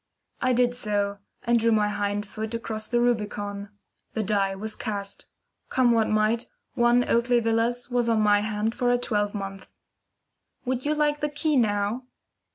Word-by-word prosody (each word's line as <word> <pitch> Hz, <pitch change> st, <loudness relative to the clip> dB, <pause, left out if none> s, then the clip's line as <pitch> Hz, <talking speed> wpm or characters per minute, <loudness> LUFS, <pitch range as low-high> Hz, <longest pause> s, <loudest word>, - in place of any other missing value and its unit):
I 255 Hz, -, +2 dB
did 245 Hz, 0 st, +3 dB
so, 205 Hz, -4 st, -1 dB, 0.2 s
and 235 Hz, 0 st, +3 dB
drew 230 Hz, +1 st, +2 dB
my 210 Hz, -1 st, +3 dB
hind 205 Hz, 0 st, -1 dB
foot 220 Hz, +2 st, -5 dB
across 220 Hz, -2 st, -4 dB
the 240 Hz, -, +1 dB
Rubicon. 205 Hz, -4 st, -1 dB, 0.4 s
The 220 Hz, -, -1 dB
die 195 Hz, -1 st, +1 dB
was 215 Hz, +2 st, -4 dB
cast. 200 Hz, -2 st, -5 dB, 0.4 s
Come 255 Hz, -2 st, +3 dB
what 225 Hz, -2 st, +2 dB
might, 215 Hz, +2 st, +1 dB, 0.3 s
1 240 Hz, +1 st, +3 dB
Oakley 240 Hz, +1 st, +3 dB
Villas 235 Hz, +2 st, 0 dB
was 240 Hz, -1 st, +1 dB
on 225 Hz, -1 st, +3 dB
my 205 Hz, -1 st, +4 dB
hand 215 Hz, +1 st, -1 dB
for 245 Hz, -1 st, +1 dB
a 245 Hz, -, +3 dB
twelve 210 Hz, -4 st, -1 dB
month. 195 Hz, -1 st, -6 dB, 1.0 s
"Would 255 Hz, +1 st, -2 dB
you 300 Hz, +1 st, +1 dB
like 295 Hz, 0 st, +1 dB
the 295 Hz, -, 0 dB
key 300 Hz, +1 st, 0 dB
now?" 215 Hz, +1 st, +1 dB
225 Hz, 165 wpm, -26 LUFS, 205-245 Hz, 1.0 s, my